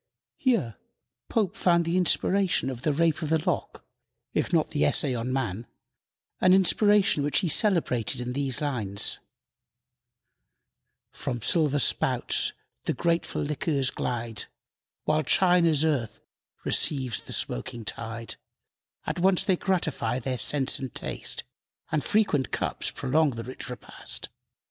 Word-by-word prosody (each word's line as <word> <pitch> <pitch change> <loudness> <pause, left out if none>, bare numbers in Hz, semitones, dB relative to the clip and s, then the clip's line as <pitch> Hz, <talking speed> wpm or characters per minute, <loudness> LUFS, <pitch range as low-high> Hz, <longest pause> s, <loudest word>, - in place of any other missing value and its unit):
Here 215 - 0 0.5
Pope 215 -6 0
found 170 -2 +2
the 170 +2 -1
inspiration 185 -3 +2
of 120 -2 -7
"The 150 - +1
Rape 160 +2 +1
of 155 - -3
the 160 -1 0
Lock," - - -2 0.5
if - - 0
not - - +2
the - - +1
"Essay 130 - +2
on 120 +1 -3
Man," 120 -4 -2 0.7
an 185 - +5
inspiration 195 -3 +4
which 145 - +1
he 180 - 0
celebrated 160 - +2
in 125 0 -4
these 135 -1 0
lines: 110 -9 0 1.9
"From 120 - -4
silver 150 - +2
spouts 140 - +2 0.3
the - - 0
grateful 170 +3 0
liquors 145 -2 0
glide, 115 -3 -3 0.6
While 155 0 +2
China's 170 -2 +4
earth 120 -9 -1 0.5
receives 130 -7 0
the - - -12
smoking 115 - -2
tide; 115 +1 -6 0.7
At - - -3
once 185 0 +3
they 190 - +2
gratify 160 - -1
their 130 0 -3
sense 140 -2 +2
and 130 -2 -5
taste, - - -3 0.5
And 155 - 0
frequent 200 - +1
cups - - -1
prolong 150 +4 +1
the 115 - -5
rich 130 +1 -7
repast. 125 - -6
145 Hz, 130 wpm, -27 LUFS, 125-170 Hz, 1.9 s, an